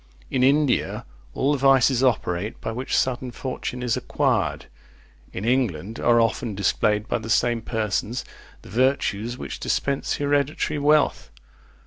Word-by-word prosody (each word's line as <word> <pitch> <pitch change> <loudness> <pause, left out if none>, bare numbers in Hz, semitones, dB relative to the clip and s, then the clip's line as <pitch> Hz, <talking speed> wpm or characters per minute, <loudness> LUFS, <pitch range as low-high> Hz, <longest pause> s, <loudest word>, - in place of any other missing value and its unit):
In 130 - +1
India 140 0 +2 0.3
all 140 - +1
the 145 - 0
vices 135 -1 +4
operate 105 -5 0
by - - -4
which 125 +3 -2
sudden 130 0 0
fortune 125 0 -5
is 120 -3 +1
acquired; - - 0 0.7
in 95 - -5
England 115 -5 0
are 120 0 +4
often 115 -1 0
displayed 105 +2 +1
by 120 - -1
the 110 0 -8
same 120 +1 +2
persons, 110 +2 -2 0.4
the - - -13
virtues 120 -1 0
which - - -6
dispense 140 -1 -1
hereditary 145 +1 0
wealth. 150 +1 +2
125 Hz, 135 wpm, -24 LUFS, 110-135 Hz, 0.7 s, vices